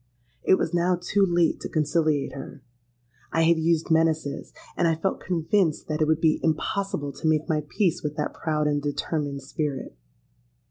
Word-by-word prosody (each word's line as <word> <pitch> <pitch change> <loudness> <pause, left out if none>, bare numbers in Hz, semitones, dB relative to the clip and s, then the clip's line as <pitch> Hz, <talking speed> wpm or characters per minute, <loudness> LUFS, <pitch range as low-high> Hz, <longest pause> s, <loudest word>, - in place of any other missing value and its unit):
It - - +5
was 170 - -2
now 175 +1 +2
too 195 +3 +1
late 175 -3 +2
to - - -6
conciliate 155 -2 +1
her: 135 0 -9 0.7
I 165 - +2
had 165 0 +4
used 165 0 +1
menaces; 160 -3 +1 0.2
and 170 - +2
I 165 - +2
felt 190 +4 -1
convinced 170 -1 0
that 155 +1 -1
it 155 - +3
would 160 0 +2
be 160 -2 +3
impossible 160 -1 -1
to 140 +4 -4
make 155 0 +2
my 155 -2 0
peace 185 -6 +1
with 150 0 -3
that 150 - -2
proud 155 -1 -1
and 145 -1 +1
determined 145 -1 -2
spirit. 135 - -4
160 Hz, 175 wpm, -25 LUFS, 150-170 Hz, 0.7 s, It